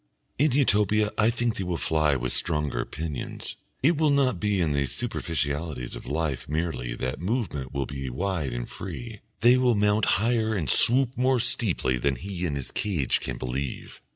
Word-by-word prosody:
In 150 Hz, +1 st, +4 dB
Utopia 105 Hz, -5 st, +3 dB
I 110 Hz, +1 st, +3 dB
think 120 Hz, -1 st, -1 dB
they 95 Hz, -, -2 dB
will 90 Hz, -2 st, -2 dB
fly 75 Hz, -3 st, +2 dB
with 65 Hz, -1 st, -2 dB
stronger 75 Hz, -7 st, -1 dB
pinions, 75 Hz, -3 st, -5 dB, 0.3 s
it 160 Hz, +3 st, +4 dB
will 155 Hz, -1 st, +3 dB
not 135 Hz, -8 st, +2 dB
be 105 Hz, -1 st, +1 dB
in 85 Hz, -4 st, +2 dB
the 70 Hz, -1 st, +1 dB
superficialities 75 Hz, -, -3 dB
of -, -, -9 dB
life 75 Hz, -3 st, -2 dB
merely 75 Hz, -7 st, -2 dB
that 65 Hz, +4 st, -3 dB
movement 90 Hz, -, -2 dB
will 70 Hz, -1 st, -1 dB
be 70 Hz, 0 st, -5 dB
wide 80 Hz, 0 st, -2 dB
and -, -, -4 dB
free, 115 Hz, -3 st, -7 dB, 0.2 s
they 120 Hz, +3 st, +7 dB
will 125 Hz, -2 st, +3 dB
mount 105 Hz, +1 st, +3 dB
higher 110 Hz, 0 st, +1 dB
and 85 Hz, -7 st, +2 dB
swoop 130 Hz, +1 st, +3 dB
more 130 Hz, 0 st, +2 dB
steeply 80 Hz, -, +1 dB
than 70 Hz, +2 st, +1 dB
he 90 Hz, +4 st, -4 dB
in 75 Hz, -, -2 dB
his 70 Hz, -2 st, -2 dB
cage 90 Hz, -, 0 dB
can -, -, -4 dB
believe. 65 Hz, +1 st, -5 dB
85 Hz, 180 wpm, -26 LUFS, 70-115 Hz, 0.3 s, they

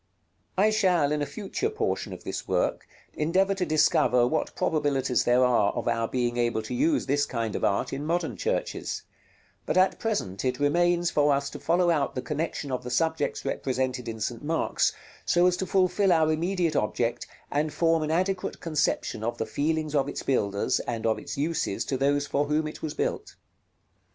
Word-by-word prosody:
§ -, -, -47 dB, 0.6 s
LXIV. 200 Hz, -, +5 dB
I -, -, +5 dB
shall, 180 Hz, -9 st, +2 dB
in 150 Hz, 0 st, 0 dB
a 145 Hz, -, -1 dB
future 220 Hz, -, -3 dB
portion 435 Hz, -, -2 dB
of -, -, -8 dB
this -, -, -5 dB
work, -, -, 0 dB, 0.3 s
endeavor 185 Hz, +6 st, +2 dB
to 190 Hz, -2 st, -2 dB
discover 125 Hz, -5 st, +3 dB
what 140 Hz, +6 st, -1 dB
probabilities 140 Hz, -4 st, +1 dB
there 125 Hz, +1 st, +4 dB
are 115 Hz, -5 st, +3 dB
of -, -, -4 dB
our 115 Hz, -1 st, +1 dB
being 120 Hz, -1 st, -1 dB
able 120 Hz, -2 st, 0 dB
to -, -, -6 dB
use 295 Hz, +4 st, +1 dB
this 145 Hz, +1 st, +1 dB
kind 115 Hz, -3 st, -3 dB
of -, -, -3 dB
art 100 Hz, +5 st, +1 dB
in 140 Hz, +2 st, -3 dB
modern 165 Hz, +1 st, -1 dB
churches; 480 Hz, +3 st, -2 dB, 0.6 s
but -, -, 0 dB
at 185 Hz, +1 st, +3 dB
present 100 Hz, -, -2 dB
it 125 Hz, -1 st, -1 dB
remains 175 Hz, +4 st, +2 dB
for 145 Hz, 0 st, +3 dB
us 140 Hz, 0 st, 0 dB
to -, -, -8 dB
follow 175 Hz, +1 st, +2 dB
out 145 Hz, -4 st, 0 dB
the 130 Hz, -, -2 dB
connexion 150 Hz, -2 st, -3 dB
of 125 Hz, 0 st, -2 dB
the 125 Hz, -, -5 dB
subjects 160 Hz, +6 st, 0 dB
represented 130 Hz, -2 st, -2 dB
in 110 Hz, -1 st, -6 dB
St. 115 Hz, +3 st, -3 dB
Mark's 160 Hz, +2 st, +1 dB, 0.3 s
so 175 Hz, 0 st, +3 dB
as 180 Hz, -1 st, +4 dB
to 190 Hz, -, -3 dB
fulfil 190 Hz, +1 st, +2 dB
our 160 Hz, -2 st, +4 dB
immediate 170 Hz, +1 st, 0 dB
object, 115 Hz, +2 st, -1 dB, 0.2 s
and 150 Hz, +2 st, 0 dB
form 165 Hz, +1 st, +2 dB
an 155 Hz, -, -2 dB
adequate 185 Hz, +3 st, -1 dB
conception 150 Hz, -8 st, -1 dB
of 120 Hz, +1 st, -2 dB
the 110 Hz, -, -2 dB
feelings 155 Hz, +5 st, -1 dB
of 140 Hz, -1 st, +1 dB
its -, -, -5 dB
builders, 100 Hz, -6 st, +1 dB
and 115 Hz, -2 st, -4 dB
of 110 Hz, -1 st, +1 dB
its -, -, -7 dB
uses 145 Hz, -8 st, -1 dB
to 135 Hz, -, -2 dB
those 140 Hz, +2 st, +1 dB
for 145 Hz, +1 st, 0 dB
whom 150 Hz, +2 st, 0 dB
it 155 Hz, -, -8 dB
was 155 Hz, -1 st, -4 dB
built. -, -, -3 dB
150 Hz, 195 wpm, -27 LUFS, 125-170 Hz, 0.6 s, LXIV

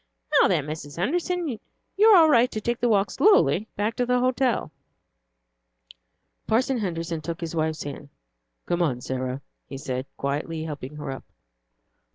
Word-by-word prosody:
"Now, -, -, +6 dB
then, -, -, +1 dB
Mrs. 150 Hz, -1 st, -7 dB
Henderson, 345 Hz, -, -1 dB, 0.5 s
you 420 Hz, +2 st, +5 dB
are 425 Hz, -4 st, +8 dB
all 325 Hz, -2 st, +7 dB
right 245 Hz, -1 st, +5 dB
to 215 Hz, -, -4 dB
take 235 Hz, +2 st, -2 dB
the 240 Hz, -, +1 dB
walk 200 Hz, -2 st, +2 dB
slowly 390 Hz, -, +4 dB
back 210 Hz, +2 st, -1 dB
to 245 Hz, -, +1 dB
the 250 Hz, 0 st, +2 dB
hotel." 255 Hz, -1 st, +1 dB, 1.8 s
Parson 255 Hz, +3 st, +1 dB
Henderson 165 Hz, -4 st, -3 dB
took 165 Hz, +2 st, -5 dB
his 165 Hz, -1 st, -5 dB
wife's 160 Hz, -1 st, -1 dB
hand. 145 Hz, 0 st, -8 dB, 0.6 s
"Come, 170 Hz, -8 st, 0 dB
Sarah," 130 Hz, +1 st, -4 dB, 0.3 s
he 135 Hz, -, -7 dB
said, 130 Hz, -1 st, -4 dB
gently 150 Hz, +3 st, -2 dB
helping 150 Hz, -2 st, -7 dB
her 145 Hz, -2 st, -5 dB
up. 135 Hz, -, -8 dB
170 Hz, 155 wpm, -25 LUFS, 145-245 Hz, 1.8 s, are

